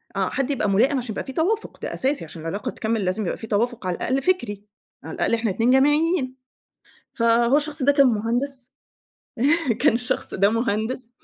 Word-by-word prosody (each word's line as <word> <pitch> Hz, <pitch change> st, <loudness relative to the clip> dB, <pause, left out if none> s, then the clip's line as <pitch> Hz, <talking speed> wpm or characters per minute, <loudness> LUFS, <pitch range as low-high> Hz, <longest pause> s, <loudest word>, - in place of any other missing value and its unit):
آه، -, -, 0 dB
حد 275 Hz, +1 st, -1 dB
يبقى 235 Hz, -6 st, 0 dB
ملائم 245 Hz, +9 st, +3 dB
عشان 245 Hz, -3 st, -3 dB
يبقى -, -, -4 dB
في 265 Hz, -, -8 dB
توافق، 410 Hz, +9 st, -1 dB
ده -, -, -3 dB
أساسي 270 Hz, -, -1 dB
عشان 160 Hz, +1 st, -10 dB
العلاقة 200 Hz, +10 st, -4 dB
تكمل 220 Hz, -2 st, -2 dB
لازم 190 Hz, +4 st, -1 dB
يبقى -, -, -2 dB
في 225 Hz, -, -8 dB
توافق 225 Hz, -1 st, -1 dB
على 180 Hz, -, 0 dB
الأقل 265 Hz, +2 st, -1 dB
فكري، 235 Hz, -, -1 dB, 0.4 s
على -, -, -7 dB
الأقل -, -, 0 dB
إحنا 225 Hz, -1 st, +1 dB
ال2 230 Hz, +6 st, +2 dB
جامعيين. 295 Hz, 0 st, +2 dB, 0.8 s
فهو 235 Hz, +3 st, +3 dB
الشخص 300 Hz, 0 st, -2 dB
ده 285 Hz, +2 st, +5 dB
كان 280 Hz, -1 st, +5 dB
مهندس 245 Hz, +3 st, -1 dB, 1.1 s
كان 295 Hz, -, +5 dB
الشخص 245 Hz, +1 st, -2 dB
ده 200 Hz, +2 st, +3 dB
مهندس 230 Hz, +2 st, -2 dB
240 Hz, 180 wpm, -23 LUFS, 220-275 Hz, 1.1 s, ده